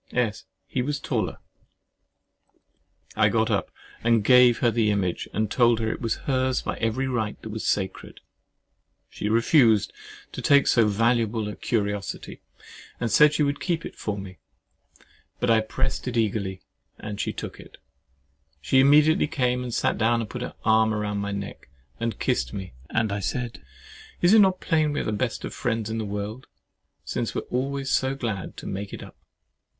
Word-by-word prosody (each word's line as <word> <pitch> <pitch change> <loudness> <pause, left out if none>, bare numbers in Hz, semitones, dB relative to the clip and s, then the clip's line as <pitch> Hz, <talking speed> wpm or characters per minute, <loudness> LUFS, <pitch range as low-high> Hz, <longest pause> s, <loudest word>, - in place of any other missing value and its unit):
S. 115 -4 -1 0.2
He 130 - -2
was 145 +3 -2
taller! 110 - -2 1.8
[I - - +4
got - - +1
up - - 0 0.3
and 115 -2 +3
gave 125 0 +6
her 120 - +2
the 115 -2 +2
image, 95 -4 -1
and 110 +1 -1
told 120 -2 +4
her 110 -1 0
it - - -6
was 115 -2 0
hers 130 -1 +1
by - - -3
every 115 +4 -1
right 110 -5 -2
that 110 - -6
was 110 0 -4
sacred. 95 -2 -2 0.9
She 105 - -3
refused 115 -1 +4
at - - -32 0.3
first - - -32
to - - -5
take 140 -1 +5
so 115 -3 +4
valuable 115 0 +1
a 105 - -5
curiosity, 105 -3 -3 0.6
and 115 - -1
said 150 0 +6
she 150 - +2
would 140 0 0
keep 170 -3 -2
it - - -8
for 105 -1 -4
me. 95 -2 -9 1.0
But 125 - +2
I 110 -1 +5
pressed 130 +4 -3
it 125 -1 -2
eagerly, 100 -4 -1 0.3
and 105 -2 -5
she - - -1
look - - -7
it. - - -14 0.8
She 75 - +2
immediately 150 +3 +5
came 125 -3 0
and 125 -1 -5
sat - - 0
down, 115 +1 +3
and 115 - -3
put 125 - -5
her 125 - -5
arm 110 0 +4
round 105 -1 -2
my 100 0 -3
neck, 100 -9 -6 0.3
and 115 0 -2
kissed - - -1
me, 95 -5 -6 0.2
and 110 -2 0
I 100 - -1
said, 120 +4 -3 0.6
"Is 175 +3 +4
it 220 - +8
not 190 -2 +4
plain 155 -3 +1
we - - -1
are - - -3
the - - -2
best 115 +3 -2
friends 115 -3 -2
in 115 - -2
the 110 - -2
world, 105 +5 -5 0.6
since 115 +9 -3
we - - 0
are - - -19
always 135 +2 -2
so 130 +1 +1
glad 110 -8 -4
to - - -9
make 100 +1 -5
it - - -7
up?" - - -13
115 Hz, 185 wpm, -25 LUFS, 105-130 Hz, 1.8 s, it